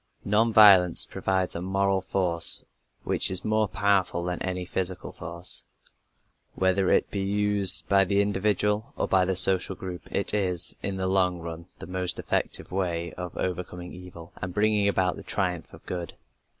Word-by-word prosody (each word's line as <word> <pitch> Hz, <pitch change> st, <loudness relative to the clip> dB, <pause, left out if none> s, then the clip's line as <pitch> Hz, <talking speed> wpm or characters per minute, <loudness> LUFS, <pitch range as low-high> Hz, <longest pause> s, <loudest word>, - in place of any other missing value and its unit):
Non 110 Hz, +3 st, +2 dB
violence 95 Hz, -5 st, +6 dB
provides 95 Hz, -1 st, -2 dB
a 85 Hz, -, -4 dB
moral 95 Hz, +1 st, -1 dB
force 90 Hz, -3 st, +2 dB, 0.4 s
which -, -, +1 dB
is 95 Hz, 0 st, -3 dB
more 110 Hz, 0 st, +1 dB
powerful 100 Hz, -3 st, 0 dB
than 90 Hz, 0 st, -4 dB
any 90 Hz, -1 st, -4 dB
physical 90 Hz, 0 st, -4 dB
force. 85 Hz, +1 st, -7 dB, 0.9 s
Whether 95 Hz, 0 st, +1 dB
it -, -, +1 dB
be 100 Hz, -, -3 dB
used 100 Hz, -1 st, +1 dB
by 100 Hz, 0 st, +3 dB
the 100 Hz, +2 st, 0 dB
individual 105 Hz, +1 st, -1 dB
or -, -, -1 dB
by 95 Hz, -1 st, +2 dB
the 95 Hz, 0 st, -2 dB
social 95 Hz, +1 st, +8 dB
group, 90 Hz, -3 st, -9 dB
it -, -, -1 dB
is, 90 Hz, -5 st, -1 dB
in 95 Hz, -1 st, -3 dB
the 95 Hz, -, -3 dB
long 95 Hz, -1 st, +1 dB
run, 85 Hz, 0 st, -9 dB
the -, -, -10 dB
most 90 Hz, 0 st, -4 dB
effective -, -, -3 dB
way 85 Hz, -3 st, -3 dB
of 90 Hz, -1 st, -8 dB
overcoming 90 Hz, -1 st, -5 dB
evil 90 Hz, -2 st, -12 dB
and 90 Hz, -1 st, -7 dB
bringing 105 Hz, -1 st, +1 dB
about 95 Hz, -2 st, 0 dB
the -, -, -9 dB
triumph 90 Hz, -4 st, -3 dB
of -, -, -16 dB
good. 90 Hz, -2 st, -6 dB
95 Hz, 165 wpm, -25 LUFS, 90-100 Hz, 0.9 s, social